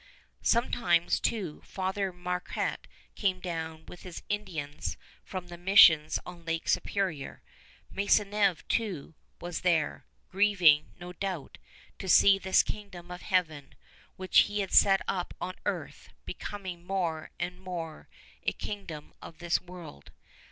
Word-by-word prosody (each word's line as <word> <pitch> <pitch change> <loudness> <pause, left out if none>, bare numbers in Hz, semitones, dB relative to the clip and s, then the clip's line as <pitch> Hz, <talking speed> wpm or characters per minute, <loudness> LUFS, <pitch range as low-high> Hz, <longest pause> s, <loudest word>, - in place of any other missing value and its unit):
Sometimes, 180 -7 +2
too, 190 -10 -2
Father 190 0 -2
Marquette 180 0 -3 0.3
came 190 -3 0
down 160 -3 -5
with 175 - -11
his 180 -2 -9
Indians 175 -9 -3 0.3
from 185 -2 -6
the 175 -1 -10
missions 165 -5 +7
on 175 -1 -10
Lake 165 0 -3
Superior. 185 -9 -1 0.5
Maisonneuve, 200 -3 +2
too, 190 -10 -2 0.3
was 175 -1 -4
there, 165 -5 +1 0.2
grieving, 185 -7 +4
no 180 0 -8
doubt, 185 -5 -5 0.4
to 190 - -5
see 195 +2 +7
this 190 -1 +4
Kingdom 185 -4 -7
of 180 - -7
Heaven, 160 -6 -1 0.4
which 185 0 +4
he 205 0 +2
had 195 - -4
set 195 -1 +6
up 180 -2 -2
on 185 +1 -4
earth, - - -4 0.2
becoming 185 -4 -6
more 175 -4 -2
and 180 +1 -3
more 170 -4 -6 0.3
a - - 0
kingdom 175 -8 -7
of 165 - -11
this 175 0 0
world. 175 - -11
180 Hz, 130 wpm, -29 LUFS, 165-195 Hz, 0.5 s, missions